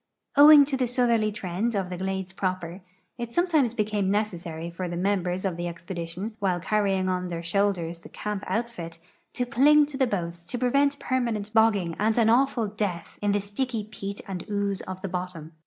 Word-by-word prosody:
Owing 290 Hz, 0 st, +9 dB
to 275 Hz, -1 st, -1 dB
the 255 Hz, -1 st, +1 dB
southerly 235 Hz, -3 st, +2 dB
trend 205 Hz, +3 st, -2 dB
of 190 Hz, -2 st, -2 dB
the 180 Hz, -, -4 dB
glades 190 Hz, 0 st, -3 dB
proper, 185 Hz, -1 st, -3 dB, 0.4 s
it 235 Hz, 0 st, -5 dB
sometimes 315 Hz, -9 st, +2 dB
became 210 Hz, -3 st, 0 dB
necessary 170 Hz, -5 st, -2 dB
for 180 Hz, +1 st, -4 dB
the 175 Hz, -, -4 dB
members 185 Hz, -1 st, 0 dB
of 180 Hz, -3 st, -1 dB
tbe 175 Hz, 0 st, -3 dB
expedition, 175 Hz, +4 st, -6 dB
while 185 Hz, -3 st, +1 dB
canying 195 Hz, -1 st, +1 dB
on 180 Hz, -1 st, -1 dB
their 170 Hz, -1 st, -4 dB
shoulders 175 Hz, -2 st, 0 dB
the -, -, -13 dB
camp 210 Hz, -1 st, -4 dB
outfit, 200 Hz, -9 st, -3 dB, 0.4 s
to 245 Hz, -, -1 dB
cling 290 Hz, +4 st, +5 dB
to 285 Hz, -2 st, -7 dB
the 265 Hz, -2 st, +3 dB
boats 170 Hz, -5 st, -3 dB
to 210 Hz, +8 st, -5 dB
prevent 280 Hz, +3 st, +2 dB
permanent 230 Hz, -6 st, -2 dB
bogging 205 Hz, -7 st, +3 dB
and 220 Hz, +2 st, +2 dB
an 225 Hz, -1 st, +5 dB
awful 245 Hz, -1 st, +3 dB
death 200 Hz, -5 st, -4 dB
in 205 Hz, 0 st, +2 dB
the 205 Hz, -, +2 dB
sticky 215 Hz, +3 st, -3 dB
peat 200 Hz, -1 st, -6 dB
and 185 Hz, -3 st, -5 dB
ooze 200 Hz, -2 st, -1 dB
of 185 Hz, 0 st, -5 dB
the -, -, -1 dB
bottom. 180 Hz, -3 st, -5 dB
200 Hz, 190 wpm, -26 LUFS, 180-235 Hz, 0.4 s, Owing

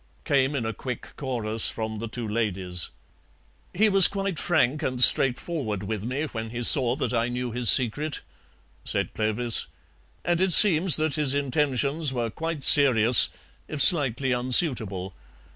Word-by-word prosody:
came 140 Hz, -1 st, 0 dB
in 125 Hz, -5 st, -4 dB
a 115 Hz, -, -4 dB
quick 125 Hz, 0 st, -9 dB
chorus 115 Hz, -5 st, -1 dB
from 110 Hz, -1 st, -6 dB
the 115 Hz, -, -6 dB
two 115 Hz, +1 st, -6 dB
ladies. 95 Hz, -5 st, -2 dB, 0.8 s
"He 215 Hz, +5 st, +1 dB
was 195 Hz, -2 st, +7 dB
quite 195 Hz, -5 st, -5 dB
frank 150 Hz, -3 st, -1 dB
and 130 Hz, -4 st, -4 dB
straightforward 125 Hz, -, +1 dB
with 105 Hz, 0 st, -6 dB
me 130 Hz, +5 st, -4 dB
when 115 Hz, -7 st, -7 dB
he 120 Hz, +1 st, -7 dB
saw 125 Hz, 0 st, +3 dB
that 140 Hz, -, -4 dB
I 115 Hz, 0 st, -1 dB
knew 125 Hz, 0 st, -5 dB
his 120 Hz, 0 st, +1 dB
secret," 140 Hz, +5 st, +2 dB, 0.6 s
said -, -, -3 dB
Clovis, 110 Hz, +2 st, -1 dB, 0.6 s
"and 175 Hz, 0 st, -1 dB
it 190 Hz, -2 st, +2 dB
seems 175 Hz, -5 st, +6 dB
that 155 Hz, -1 st, -1 dB
his 145 Hz, -2 st, 0 dB
intentions 140 Hz, +1 st, -1 dB
were 120 Hz, -3 st, -4 dB
quite 160 Hz, +1 st, -6 dB
serious, 125 Hz, -5 st, +5 dB, 0.4 s
if 150 Hz, -, -7 dB
slightly 135 Hz, -4 st, +3 dB
unsuitable. 120 Hz, -, -2 dB
125 Hz, 150 wpm, -23 LUFS, 115-150 Hz, 0.8 s, was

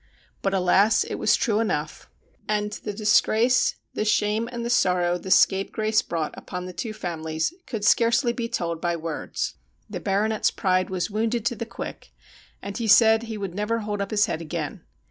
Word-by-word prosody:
But, 195 Hz, 0 st, 0 dB
alas! 190 Hz, +3 st, +4 dB
it -, -, -5 dB
was 210 Hz, -, +4 dB
true 215 Hz, -2 st, +1 dB
enough; 155 Hz, -9 st, -2 dB, 0.4 s
and 210 Hz, 0 st, 0 dB
the 210 Hz, 0 st, -5 dB
disgrace, 220 Hz, +4 st, +3 dB, 0.2 s
the -, -, -1 dB
shame, 215 Hz, +2 st, +1 dB
and 235 Hz, -1 st, -4 dB
the -, -, -2 dB
sorrow 180 Hz, -5 st, +2 dB
the 190 Hz, -, -8 dB
scapegrace 215 Hz, +3 st, +3 dB
brought 165 Hz, -3 st, -3 dB
upon 180 Hz, -1 st, -6 dB
the 180 Hz, -, -7 dB
two 225 Hz, +4 st, -4 dB
families 160 Hz, -, -3 dB
could 220 Hz, -5 st, -3 dB
scarcely 235 Hz, +3 st, +3 dB
be 235 Hz, -1 st, -4 dB
told 170 Hz, -7 st, -2 dB
by 175 Hz, -1 st, 0 dB
words. 165 Hz, -1 st, -4 dB, 0.3 s
The -, -, -5 dB
Baronet's 210 Hz, +2 st, +1 dB
pride 185 Hz, -1 st, 0 dB
was 185 Hz, 0 st, -2 dB
wounded 225 Hz, +2 st, -1 dB
to 240 Hz, -, 0 dB
the 230 Hz, 0 st, -5 dB
quick, -, -, -8 dB, 0.5 s
and 200 Hz, 0 st, -6 dB
he 230 Hz, -, -2 dB
said 220 Hz, +1 st, +6 dB
he 225 Hz, -2 st, -6 dB
would 195 Hz, -4 st, -5 dB
never 210 Hz, +4 st, -1 dB
hold 205 Hz, -1 st, -3 dB
up 200 Hz, -, -3 dB
his 210 Hz, -1 st, +3 dB
hea -, -, -2 dB
d 165 Hz, -, -8 dB
again. 155 Hz, -, -5 dB
210 Hz, 185 wpm, -24 LUFS, 180-225 Hz, 0.5 s, said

